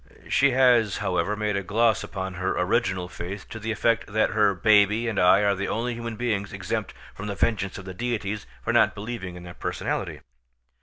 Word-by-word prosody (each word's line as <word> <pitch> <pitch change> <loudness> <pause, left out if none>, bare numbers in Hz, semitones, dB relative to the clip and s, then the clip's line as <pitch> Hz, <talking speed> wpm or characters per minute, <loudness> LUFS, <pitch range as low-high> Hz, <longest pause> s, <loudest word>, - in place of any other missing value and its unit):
She 140 - +4
has, 125 -5 +4
however, 90 +3 0
made 105 -1 -1
a 100 - 0
gloss 110 +2 +2
upon 95 0 -5
her 95 +1 -2
original 95 -1 0
faith 90 +3 -7
to 110 - -7
the 110 +1 -3
effect 115 +1 +1
that 110 +1 +2
her 105 -2 +3
baby 105 +3 +4
and 110 - -1
I 95 +3 +5
are 100 -1 +3
the 100 +1 -3
only 120 +2 -1
human 115 -1 -5
beings 105 -4 -2
exempt - - -3 0.2
from 105 - -7
the 100 - -3
vengeance 100 -4 0
of 95 - -9
the 95 - -7
deities 105 -1 -3 0.2
for - - 0
not - - +4
believing 100 -4 -6
in 90 - -10
their 90 0 -9
personality. - - -3
105 Hz, 200 wpm, -25 LUFS, 95-115 Hz, 0.2 s, I